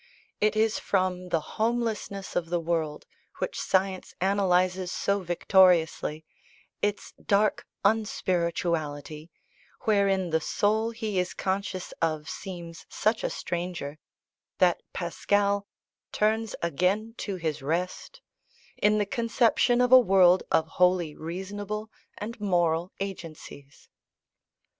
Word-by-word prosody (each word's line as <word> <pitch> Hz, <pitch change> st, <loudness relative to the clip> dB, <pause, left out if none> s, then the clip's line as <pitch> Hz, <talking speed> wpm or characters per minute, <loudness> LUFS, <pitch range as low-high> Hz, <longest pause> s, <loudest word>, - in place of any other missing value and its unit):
It 215 Hz, +1 st, +2 dB
is 220 Hz, 0 st, +2 dB
from 185 Hz, -2 st, -1 dB
the 165 Hz, -, +2 dB, 0.2 s
homelessness 225 Hz, -4 st, -1 dB
of 165 Hz, -2 st, -1 dB
the 175 Hz, 0 st, +1 dB
world 160 Hz, -2 st, -2 dB, 0.3 s
which -, -, -3 dB
science 190 Hz, 0 st, 0 dB
analyses 185 Hz, -1 st, +2 dB
so 200 Hz, 0 st, 0 dB
victoriously, 175 Hz, -3 st, +3 dB, 0.6 s
its 205 Hz, 0 st, -2 dB
dark 205 Hz, +1 st, +2 dB, 0.2 s
unspirituality, 170 Hz, -7 st, -1 dB, 0.5 s
wherein 195 Hz, -4 st, +2 dB
the 160 Hz, 0 st, +2 dB
soul 215 Hz, +6 st, +1 dB
he 220 Hz, -4 st, -2 dB
is 180 Hz, 0 st, -2 dB
conscious 190 Hz, -1 st, -2 dB
of 155 Hz, -2 st, 0 dB
seems 170 Hz, -3 st, -8 dB
such 220 Hz, +1 st, 0 dB
a -, -, 0 dB
stranger, 170 Hz, -4 st, -4 dB, 0.6 s
that 180 Hz, -2 st, +3 dB
Pascal 200 Hz, +3 st, 0 dB, 0.4 s
"turns 220 Hz, 0 st, 0 dB
again 185 Hz, +7 st, 0 dB
to 200 Hz, -, -3 dB
his 160 Hz, -4 st, -3 dB
rest," 170 Hz, +6 st, -3 dB, 0.6 s
in 210 Hz, 0 st, +3 dB
the 205 Hz, -, +1 dB
conception 235 Hz, +1 st, +2 dB
of 250 Hz, 0 st, +2 dB
a 255 Hz, -, +11 dB
world 185 Hz, -5 st, +5 dB
of 160 Hz, -, +3 dB
wholly 180 Hz, -1 st, +2 dB
reasonable 205 Hz, +6 st, -5 dB, 0.3 s
and 225 Hz, +2 st, -6 dB
moral 175 Hz, -3 st, +1 dB
agencies. 165 Hz, -7 st, -8 dB
185 Hz, 110 wpm, -27 LUFS, 170-205 Hz, 0.6 s, a